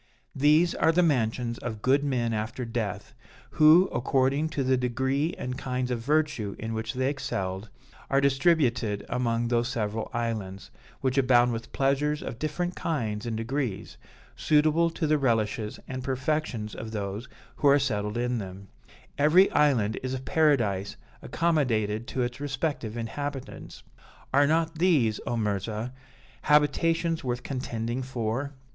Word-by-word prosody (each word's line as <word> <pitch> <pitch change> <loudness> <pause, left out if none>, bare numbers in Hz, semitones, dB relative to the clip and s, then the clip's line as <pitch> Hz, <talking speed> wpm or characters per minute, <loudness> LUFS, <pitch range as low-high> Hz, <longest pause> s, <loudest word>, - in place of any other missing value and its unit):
These 155 +5 +4
are 160 - +3
the 180 +2 +3
mansions 120 -5 0
of 110 -3 -6
good 140 +2 +3
men 120 -5 0
after 110 +3 -3
death, 105 -4 -4 0.4
who, 160 +5 +6
according 135 +5 +1
to 145 -3 -2
the 130 0 +3
degree 130 +5 0
and 125 0 -4
kinds 125 -1 -2
of 120 - -1
virtue 140 -6 0
in 110 +1 -5
which 110 +2 -3
they 130 +1 0
excelled, 100 -7 -3 0.4
are 135 - +3
distributed 135 - +2
among 120 -1 0
these 120 0 +1
several 110 -3 -3
islands, 110 -5 -4 0.3
which 130 0 +1
abound 125 -2 +4
with 115 0 -6
pleasures 140 +2 0
of 120 - -6
different 175 +4 -2
kinds 115 -8 -2
and 115 -2 -2
degrees, 120 -3 -3 0.4
suitable 155 +2 +3
to 165 0 -3
the 155 0 +2
relishes 110 -4 0
and 130 -1 -5
perfections 130 -4 -2
of 110 - -6
those 105 +1 -4 0.3
who 145 - +2
are 140 0 +7
settled 105 -5 -1
in 120 0 0
them: 95 -1 -8 0.5
every 165 +7 +5
island 125 -8 +2
is 130 0 -3
a - - -4
paradise 125 -10 +1 0.3
accommodated 120 -9 0
to 130 - -1
its 120 +2 -4
respective 135 -5 -3
inhabitants. 135 +4 -6 0.5
Are 140 +1 +5
not 160 +1 0
these, 140 - +3
O 120 - -1
Mirzah, 105 +2 -2 0.5
habitations 165 +3 +2
worth 125 -1 -3
contending 120 -2 -3
for? 130 +2 -3
125 Hz, 145 wpm, -27 LUFS, 115-145 Hz, 0.5 s, are